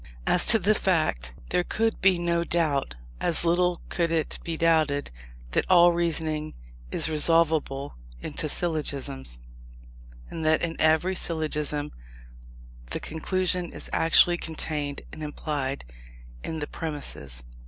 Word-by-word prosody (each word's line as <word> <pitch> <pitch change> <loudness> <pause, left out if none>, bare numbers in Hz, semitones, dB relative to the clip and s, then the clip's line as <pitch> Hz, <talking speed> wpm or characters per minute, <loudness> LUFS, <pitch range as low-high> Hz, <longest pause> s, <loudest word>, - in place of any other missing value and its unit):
As 180 - +4
to 230 - +9
the 210 +1 +2
fact, 155 - 0 0.2
there 180 - +2
could 225 +4 -1
be 185 -1 +4
no 170 0 0
doubt. 155 - 0 0.2
As 170 0 +2
little 175 +1 +1
could 170 -2 0
it 160 -2 -1
be 165 -1 -4
doubted, 155 -4 +1 0.4
that - - 0
all 175 -1 +7
reasoning 160 -2 -1 0.3
is - - +1
resolvable 155 -3 +2 0.3
into - - -4
syllogisms, 140 - -1 0.9
and 165 - -6
that 155 0 +2
in 165 -1 -2
every 160 +4 +3
syllogism 150 -3 -1 1.0
the - - -4
conclusion 180 +2 -1
is - - -9
actually 175 +1 +4
contained 150 -3 -4
and 155 - -9
implied 145 - -4 0.6
in 160 - -4
the 150 -1 -4
premises. 75 - -6
160 Hz, 125 wpm, -26 LUFS, 150-170 Hz, 1.0 s, to